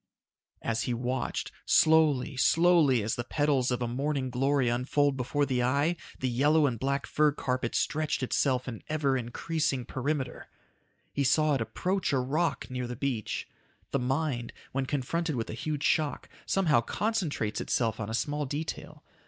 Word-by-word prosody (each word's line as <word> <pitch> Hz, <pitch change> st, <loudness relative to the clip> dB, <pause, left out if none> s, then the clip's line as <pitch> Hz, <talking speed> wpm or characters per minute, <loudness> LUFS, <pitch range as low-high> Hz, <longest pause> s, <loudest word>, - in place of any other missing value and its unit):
As 115 Hz, -1 st, -1 dB
he 120 Hz, -, 0 dB
watched, 125 Hz, +2 st, -2 dB
slowly, 155 Hz, -4 st, +4 dB
slowly, 160 Hz, -4 st, +4 dB
as 110 Hz, -, -1 dB
the 120 Hz, -, -2 dB
petals 140 Hz, -1 st, +1 dB
of 125 Hz, -1 st, -1 dB
a -, -, -1 dB
morning 135 Hz, +1 st, -1 dB
glory 135 Hz, +1 st, +2 dB
unfold 135 Hz, +4 st, +1 dB
before 135 Hz, +3 st, 0 dB
the 130 Hz, -3 st, 0 dB
eye, 140 Hz, +7 st, +2 dB, 0.2 s
the 130 Hz, -, -1 dB
yellow 145 Hz, +5 st, +3 dB
and 120 Hz, -5 st, -1 dB
black 140 Hz, +2 st, -1 dB
fur 150 Hz, 0 st, +3 dB
carpet 130 Hz, -3 st, -2 dB
stretched 155 Hz, -3 st, 0 dB
itself 130 Hz, 0 st, +1 dB
in 115 Hz, -4 st, -6 dB
ever 145 Hz, -3 st, +1 dB
increasing 130 Hz, +2 st, -1 dB
perimeter. 130 Hz, 0 st, -3 dB, 0.7 s
He 140 Hz, -, 0 dB
saw 150 Hz, +3 st, +3 dB
it 135 Hz, -, 0 dB
approach 185 Hz, -, -1 dB
a -, -, +3 dB
rock 150 Hz, +7 st, 0 dB
near 125 Hz, -1 st, -4 dB
the 125 Hz, -, -5 dB
beach. 125 Hz, -4 st, -2 dB, 0.4 s
The 140 Hz, -, +1 dB
mind, 130 Hz, -1 st, -1 dB, 0.2 s
when 135 Hz, 0 st, -1 dB
confronted 150 Hz, +4 st, -1 dB
with 115 Hz, -2 st, -3 dB
a -, -, -5 dB
huge 150 Hz, +5 st, -3 dB
shock, 155 Hz, -2 st, +1 dB, 0.2 s
somehow 165 Hz, -11 st, +3 dB
concentrates 165 Hz, -, -1 dB
itself 115 Hz, -3 st, 0 dB
on 105 Hz, -2 st, -4 dB
a 110 Hz, -, -1 dB
small 145 Hz, +4 st, -1 dB
detail. 150 Hz, +4 st, -5 dB
135 Hz, 160 wpm, -29 LUFS, 125-150 Hz, 0.7 s, slowly